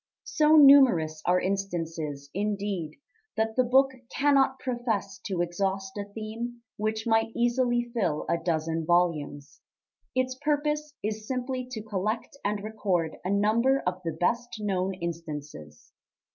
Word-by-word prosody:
So 305 0 +4
numerous 260 - +6
are 180 +1 +4
instances, 165 -7 -3
indeed, 200 -5 -2 0.4
that 220 0 0
the 255 - +4
book 265 +2 +4 0.2
cannot 275 -2 +3
profess 225 -7 -2
to 185 -4 0
exhaust 190 +2 -2
a 205 -1 -4
theme 230 +3 -6
which 215 +1 -2
might 225 0 +2
easily 240 0 +2
fill 180 -10 0
a 170 - +1
dozen 165 -1 -1
volumes; 155 -4 0 0.5
its 255 0 +1
purpose 300 +1 -1
is 215 0 -3
simply 255 0 -3
to 220 -4 -6
collect 215 +3 -3
and 205 0 -1
record 195 -7 -1
a 180 - -2
number 225 +7 +2
of 180 +1 -2
the 165 -2 -2
best 235 +7 0
known 190 -2 -1
instances. 150 - -7
210 Hz, 130 wpm, -27 LUFS, 175-240 Hz, 0.5 s, numerous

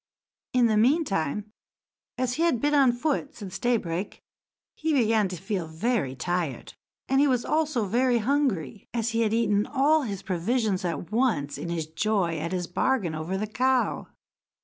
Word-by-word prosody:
In 250 -1 +4
the 220 -2 +3
mean 280 +9 +4
time, 195 - -2 0.7
as 250 -1 0
he 315 - -2
had 335 -8 +2
been 295 +3 +1
on 275 -4 +5
foot 280 +3 -2
since 195 -5 -7
daybreak, 200 -7 -1 0.5
he 315 0 -1
began 225 -6 +3
to 185 - -5
feel 185 -1 -3
very 160 - -1
tired, 170 -1 -3 0.3
and 270 +1 +2
he 290 - +4
was 250 -3 +1
also 305 -7 +1
very 245 +4 +2
hungry, 235 - -1
as 230 0 0
he 230 0 0
had 220 -2 +2
eaten 210 -2 +2
all 295 +3 +3
his 200 -8 -5
provisions 195 +2 0
at 170 +1 -3
once, 215 - +1
in 170 - -5
his 165 -2 -2
joy 170 0 0
at 165 +3 -3
his 180 -1 -1
bargain 185 -1 0
over 160 +5 -3
the 210 - -1
cow. 255 +4 0
220 Hz, 170 wpm, -26 LUFS, 180-255 Hz, 0.7 s, on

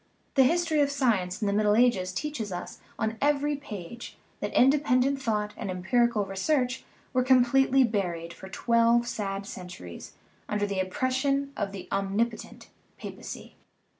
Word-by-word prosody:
The 265 -2 +5
history 330 0 +2
of 285 - +3
science 225 -10 0
in 215 - -1
the 200 - +1
Middle 210 0 +3
Ages 215 -6 +3
teaches 230 -2 -4
us 175 - -6 0.2
on 220 0 -2
every 290 0 +2
page 235 -5 -8 0.2
that - - -3
independent 270 0 +3
thought 210 -3 -1
and 205 - -5
empirical 210 +4 +1
research 250 +7 0 0.3
were 255 - +3
completely 260 +1 +4
buried 175 -7 -2
for 190 - -11
twelve 235 +3 +3
sad 195 -3 -3
centuries 180 - -9 0.4
under 210 0 0
the 200 -2 -2
oppression 265 +8 0
of 200 -2 -2
the 195 -2 -8
om 195 0 -1
nipotent 230 0 -2 0.3
papacy. - - -8
230 Hz, 145 wpm, -27 LUFS, 195-265 Hz, 0.4 s, The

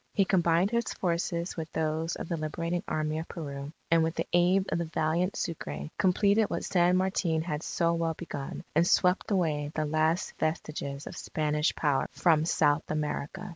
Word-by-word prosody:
He 195 - +4
combined 175 +1 +3
his 235 -1 -1
forces 170 0 -1
with 160 -1 -5
those 160 +1 -1
of - - -6
the 170 - -1
Liberating 165 +2 -2
Army 155 0 -1
of 160 - -6
Peru, 140 -3 -6 0.2
and 165 0 +5
with 160 +1 0
the - - -1
aid 180 +2 +4
of - - 0
the 170 - -1
valiant 160 +4 0
Sucre, 75 - -4
completed 200 +3 +3
what - - -2
San 180 0 +3
Martin 180 -4 +1
had 150 -3 -3
so 170 0 0
well 165 -1 -1
begun, 145 -5 -6
and 165 +2 +4
swept 180 0 +3
away 155 -7 0
the 155 - 0
last 155 +3 +1
vestiges 150 -3 -3
of - - -7
Spanish 150 0 0
power 145 -3 +1
from 160 -3 +3
South 150 -2 +2
America. 150 +4 -3
165 Hz, 175 wpm, -29 LUFS, 155-175 Hz, 0.2 s, and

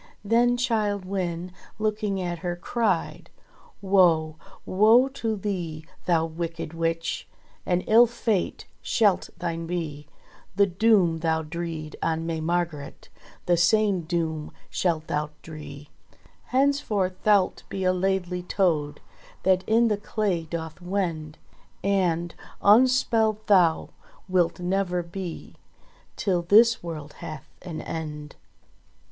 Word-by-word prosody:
Then 240 +3 +3
Childe 215 -5 0
Wynde 180 -2 -3 0.3
looking 210 -2 -1
at 175 -2 -3
her 175 0 -3
cried: 225 +6 -1 0.5
"Woe! 170 -5 +3 0.3
Woe 220 +7 +5
to 230 -5 -2
thee, 175 -6 -4 0.2
thou 165 -2 +3
wicked 165 0 -5
Witch! 165 0 -2 0.4
An 180 0 +2
ill 230 +4 +6
fate 225 -4 -1 0.2
shalt 205 -5 +2
thine 165 -1 -3
be! 155 -4 -4 0.5
The 200 +1 +5
doom 185 -3 +3
thou 160 -1 0
dreed 160 -1 -5
on 165 0 -1
May 165 -1 -2
Margret 165 -3 -3 0.4
The 175 -1 +3
same 200 +2 +3
doom 160 -2 -2 0.2
shalt 165 -4 0
thou 150 0 -2
dree. 150 -2 -10 0.5
Henceforth 250 -9 +1
thou'lt 205 -3 +3
be 190 - -3
a 185 0 +3
Laidly 180 -1 -1
Toad 165 -5 0 0.4
That 185 0 +3
in 230 +2 +4
the 210 -2 +1
clay 205 -5 -1
doth 160 +1 -6
wend, 170 -5 -3 0.5
And 175 -4 +1 0.3
unspelled 220 -1 +4
thou 180 -6 +4 0.4
wilt 180 -2 +1
never 180 -1 0
be 170 0 -7 0.6
Till 185 -4 0
this 225 +6 +5
world 155 -4 -7
hath 155 0 -7
an 165 -3 -6
end." 150 -2 -6
180 Hz, 115 wpm, -25 LUFS, 165-205 Hz, 0.6 s, ill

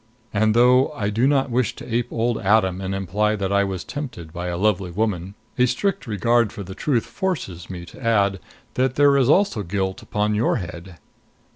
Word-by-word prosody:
And, 110 +1 +2
though 125 +3 +5
I 105 -7 -2
do 115 +5 +2
not 140 -2 +2
wish 125 -2 0
to - - -10
ape 120 0 -1
old 115 0 0
Adam 95 -3 +2
and 95 0 -3
imply 100 +3 0
that 100 -2 -2
I 100 0 +4
was 95 -2 -3
tempted 125 - -7
by 90 +1 -4
a 90 -1 -2
lovely 95 -2 +1
woman, 95 -1 -2 0.2
a 125 - +5
strict 135 +3 -1
regard 115 +1 +2
for 100 - -7
the 95 +1 -8
truth 120 0 0
forces 125 - -4
me 90 -2 -7
to 105 - -13
add 100 -4 +2 0.3
that 130 0 0
there 145 -1 +5
is 135 -2 +3
also 185 - +3
guilt 95 +3 -2
upon 105 -1 -1
your 110 +3 +1
head. 85 -3 -7
105 Hz, 195 wpm, -22 LUFS, 95-125 Hz, 0.3 s, though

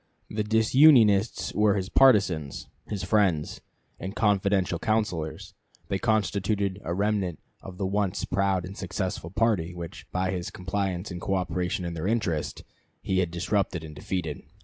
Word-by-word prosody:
The 105 0 -1
disunionists 110 -1 +4
were 105 -1 +3
his 95 -2 -2
partisans, 95 - +3 0.2
his 100 -3 -4
friends, 95 -6 +1 0.4
and 95 +4 -6
confidential 100 -4 +1
counselors; 105 -8 -2 0.4
they 95 - 0
constituted 100 -2 0
a 85 - -4
remnant 100 -3 0 0.2
of 95 -1 -10
the 95 - -2
once 100 0 -1
proud 95 -1 0
and 95 +2 -8
successful 95 -3 -4
party 95 -4 0
which, 85 -2 -8
by 95 +1 0
his 90 -2 -3
compliance 95 0 -3
and 85 -1 -6
coöperation 90 -1 -1
in 85 - -3
their 85 +2 -3
interest, 95 -9 -1 0.4
he 95 -1 +1
had 90 -2 +1
disrupted 90 0 -1
and 75 -1 -9
defeated. 80 -1 -4
95 Hz, 145 wpm, -27 LUFS, 90-105 Hz, 0.4 s, disunionists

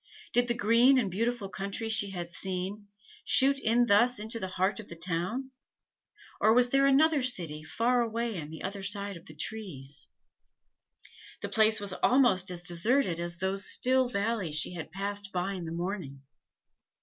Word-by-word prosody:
Did 245 0 +3
the 240 - 0
green 235 +4 +5
and 215 -7 0
beautiful 230 +2 -1
country 195 +4 -4
she 220 -2 +2
had 175 -3 -6
seen, 190 +3 -5 0.4
shoot 275 +1 +3
in 240 0 +3
thus 235 +3 +4
into 220 +2 -5
the 190 - -3
heart 190 +2 0
of 215 - -9
the 170 - -9
town, 180 +10 -3 0.9
or 220 - +5
was 245 0 +5
there 275 0 +4
another 295 +2 +4
city 170 -12 -2
far 240 +9 +1
away 230 -4 -2
on 150 - -8
the 160 - -9
other 200 0 -4
side 200 0 -4
of 170 - -13
the 155 - -12
trees? 150 -8 -7 1.4
The - - -3
place 220 0 +4
was 200 -2 -1
almost 240 -9 +4
as 175 -1 -4
deserted 175 +2 +1
as 170 0 -4
those 190 +2 -2
still 255 0 +2
valleys 200 -7 -1
she 155 - -1
had 165 -2 -7
passed 200 +2 -4
by 185 +2 -2
in 180 -3 -5
the 160 - -6
morning. 170 -6 -5
200 Hz, 175 wpm, -29 LUFS, 180-235 Hz, 1.4 s, green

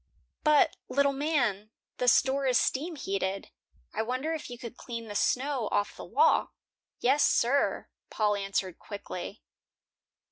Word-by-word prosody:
"But, 300 -1 +4
little 280 0 +2
man, 255 -9 0 0.3
the 250 - -1
store 270 +2 +4
is 250 -2 +4
steam 320 +6 0
heated. 195 -5 -3 0.4
I - - -1
wonder 255 +8 -2
if 310 -5 -5
you 245 - -7
could 235 -1 -8
clean 230 -3 -7
the 205 - -6
snow 255 +1 0
off 205 - 0
the - - -9
walk." 470 +2 +2 0.5
"Yes, 270 +4 +4
sir," 265 +4 +2 0.2
Paul 210 -1 +1
answered, 195 -2 -2
quickly. 200 -1 -7
245 Hz, 140 wpm, -29 LUFS, 205-280 Hz, 0.5 s, But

